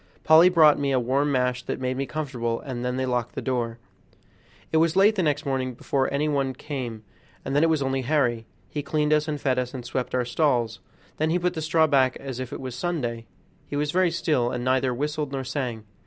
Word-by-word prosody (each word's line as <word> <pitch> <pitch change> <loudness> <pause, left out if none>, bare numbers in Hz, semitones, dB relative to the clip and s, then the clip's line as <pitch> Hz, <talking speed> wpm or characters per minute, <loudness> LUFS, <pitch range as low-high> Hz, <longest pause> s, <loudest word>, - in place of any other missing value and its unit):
Polly 160 +3 +7
brought 155 -5 +5
me 140 -1 0
a 130 - +3
warm 135 +4 +1
mash 125 -2 +1
that - - -3
made 130 0 -1
me 135 +1 -2
comfortable, 125 -7 -3
and 125 -3 -6
then 125 +1 -2
they 130 - 0
locked 125 -2 -2
the - - -2
door. 120 -3 -2 0.9
It 160 - +2
was 165 +1 +3
late 200 +3 +5
the 200 - 0
next 150 -1 0
morning 130 -2 -2
before 135 +2 -1
any 145 +2 0
one 135 -3 0
came, 125 -6 -5 0.4
and 135 - -2
then 145 - +4
it 165 - +4
was 155 -3 +1
only 135 0 -1
Harry. 125 -5 0 0.2
He 150 - -4
cleaned 150 +1 +1
us 150 0 +2
and 150 -1 -2
fed 130 -2 +1
us, 125 +1 -4
and 125 -2 -6
swept 125 +1 -3
out - - +2
the - - -3
stalls, 120 -3 +1 0.4
then 155 +1 +1
he 170 - +2
put 180 0 0
the 160 - -4
straw 160 +1 +3
back 135 -4 +3
again - - -10
as 130 -1 -5
if 130 -1 -5
it - - -5
was 130 -2 -6
Sunday. 125 -6 -3 0.4
He - - -5
was 145 0 0
very 185 +1 +3
still, 150 -7 0
and 125 0 -3
neither 130 0 +2
whistled 150 +3 -2
nor 135 -1 -3
sang. 125 -4 -3
135 Hz, 240 wpm, -25 LUFS, 125-150 Hz, 0.9 s, Polly